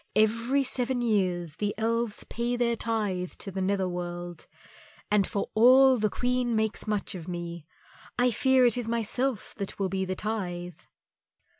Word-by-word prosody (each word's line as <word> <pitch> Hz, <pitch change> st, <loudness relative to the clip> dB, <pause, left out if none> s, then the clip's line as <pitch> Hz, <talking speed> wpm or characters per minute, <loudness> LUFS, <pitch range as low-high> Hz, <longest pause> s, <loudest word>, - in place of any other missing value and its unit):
Every 230 Hz, +6 st, +2 dB
seven 250 Hz, -1 st, 0 dB
years 180 Hz, -8 st, 0 dB
the 205 Hz, -1 st, -2 dB
Elves 230 Hz, 0 st, 0 dB
pay 240 Hz, +1 st, -2 dB
their 240 Hz, -1 st, +1 dB
tithe 210 Hz, -6 st, -2 dB
to 195 Hz, -, -7 dB
the 190 Hz, +1 st, -3 dB
Nether 190 Hz, 0 st, +1 dB
world, 175 Hz, -1 st, -6 dB, 0.6 s
and 205 Hz, -2 st, +3 dB
for 200 Hz, -, -3 dB
all 255 Hz, +3 st, +6 dB
the 215 Hz, 0 st, +2 dB
Queen 245 Hz, +1 st, 0 dB
makes 220 Hz, 0 st, -1 dB
much 210 Hz, -2 st, -2 dB
of 175 Hz, -3 st, -8 dB
me, 170 Hz, -2 st, -6 dB, 0.5 s
I 245 Hz, 0 st, +3 dB
fear 260 Hz, +2 st, +4 dB
it 240 Hz, 0 st, +4 dB
is 235 Hz, -, -4 dB
myself 235 Hz, +1 st, -1 dB
that 200 Hz, -2 st, -5 dB
will 195 Hz, -1 st, -1 dB
be 190 Hz, 0 st, -1 dB
the 185 Hz, 0 st, -3 dB
tithe." 180 Hz, -6 st, -4 dB
215 Hz, 160 wpm, -28 LUFS, 185-240 Hz, 0.6 s, all